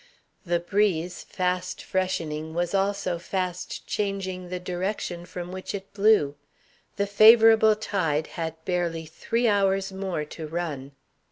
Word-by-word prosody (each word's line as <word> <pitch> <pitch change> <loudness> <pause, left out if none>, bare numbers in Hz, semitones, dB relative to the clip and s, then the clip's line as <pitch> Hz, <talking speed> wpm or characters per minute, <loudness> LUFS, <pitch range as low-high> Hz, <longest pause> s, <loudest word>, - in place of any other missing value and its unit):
The 175 0 +2
breeze, 180 -2 0
fast 180 0 -2
freshening, 160 -4 -2
was 175 +1 -1
also 195 -3 0
fast 180 0 -4
changing 190 -3 -3
the 180 0 -3
direction 180 -1 -3
from 175 0 -6
which 185 +2 -5
it 195 0 -8
blew. 205 -8 +4 0.6
The 200 - 0
favorable 220 +1 +7
tide 165 -8 -1
had 165 -1 -3
barely 170 -3 -1
three 230 +9 -1
hours 195 -2 +2
more 190 -5 -3
to 155 +1 -8
run. 150 -4 -4
185 Hz, 125 wpm, -26 LUFS, 170-200 Hz, 0.6 s, favorable